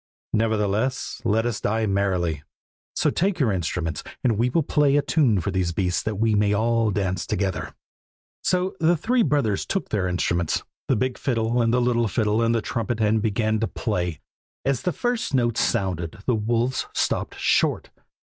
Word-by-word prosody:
Nevertheless, 110 +2 0
let 115 0 +1
us 120 -2 -2
die 110 +1 0
merrily, 95 -6 0 0.5
so - - +2
take 185 +1 0
your 125 -7 +3
instruments 85 -3 -2 0.2
and 120 -3 +3
we 120 +4 +1
will 160 +5 +1
play 145 -1 +2
a - - +4
tune 140 - +2
for 95 +4 -2
these 90 -2 0
beasts, 90 0 0
that 110 - -3
we 110 +2 +1
may 105 0 +2
all 115 +1 +2
dance 95 -3 -1
together.' 95 -1 -2 0.7
"So 185 +1 0
the 165 +2 +3
three 245 +9 +1
brothers 140 - +1
took 195 - -3
their 95 -4 0
instruments, 85 -2 0 0.2
the 130 - +3
big 130 +3 -1
fiddle, 120 -1 0
and 115 -1 +2
the 125 - +3
little 120 -1 +2
fiddle, 105 +1 +1
and 115 0 +2
the 115 - 0
trumpet, 115 0 -2
and 110 0 +2
began 110 0 0
to 115 - 0
play. 90 -7 -2 0.5
As 135 -2 +1
the 180 - 0
first 240 - -1
notes 120 -3 +1
sounded 90 -4 -1
the 125 - +2
wolves 115 +3 0
stopped - - -1
short. - - +1
110 Hz, 175 wpm, -24 LUFS, 100-125 Hz, 0.7 s, a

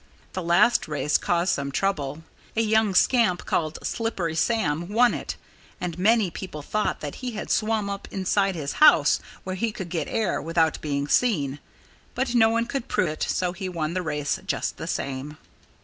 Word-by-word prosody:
That 185 - -3
last 185 +8 +3
race 150 -1 +1
caused 175 +1 +1
some 140 0 -2
trouble. 150 -4 -1 0.3
A - - +4
young 220 -2 +2
scamp 225 -5 +3
called 155 -1 -1
Slippery 195 -8 -2
Sam 165 -3 0
won 240 +3 +4
it. - - -4 0.4
And 180 -1 -4
many 215 -1 +3
people 155 -4 -7
thought 215 +7 -1
that 145 -2 -5
he 250 -2 -4
had 215 - -5
swum 215 -1 +1
up 200 0 -5
inside 195 0 0
his 145 -4 -3
house, 310 - +6 0.2
where 185 0 -4
he 225 +4 -1
could 190 -4 -7
get 165 -3 -2
air, 220 -3 -1
without 165 -1 +1
being 140 -1 -2
seen. 145 - +1 0.6
But 255 -1 -1
no 225 -2 +5
one 230 +1 +1
could 270 0 -4
prove - - +1
it; 155 - -6
so 180 -1 0
he 185 +1 -5
won 165 -2 -2
the 185 - -1
race, 150 -3 -2
just - - -2
the - - -6
same. 140 +3 -4
185 Hz, 180 wpm, -25 LUFS, 155-220 Hz, 0.6 s, house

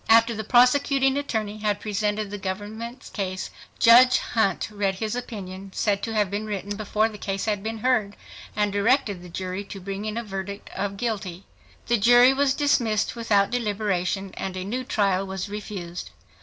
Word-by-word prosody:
After 230 +1 +6
the 220 0 -4
prosecuting 265 +3 +4
attorney 220 -7 -2
had 210 -1 0
presented 210 0 -2
the 205 - -5
government's 215 +6 -6
case, 190 -2 -4 0.3
Judge 250 +2 +7
Hunt 210 -5 0
read 200 -2 -1
his 215 +3 -3
opinion, 195 -6 -6
said 200 -2 +1
to 225 -1 -3
have 205 -3 +1
been 210 +2 -3
written 205 0 -4
before 215 +1 +1
the 210 -2 -9
case 195 -1 -3
had 210 -2 0
been 225 +2 -4
heard, 215 -4 +1 0.4
and 210 -1 +1
directed 205 -2 +2
the 180 - -11
jury 185 +2 -4
to 195 - -8
bring 195 +2 -5
in 215 +1 -3
a 235 - -2
verdict 200 -1 -6
of 200 0 -3
guilty. 195 -6 -3 0.4
The 235 - +2
jury 245 +4 +6
was 275 0 +2
dismissed 250 -9 +1
without 210 -4 +2
deliberation 200 -4 -1
and 190 -1 -4
a 185 - -3
new 250 +6 -3
trial 195 -5 +1
was 190 +1 -4
refused. 195 -4 -6
210 Hz, 175 wpm, -25 LUFS, 195-230 Hz, 0.4 s, Judge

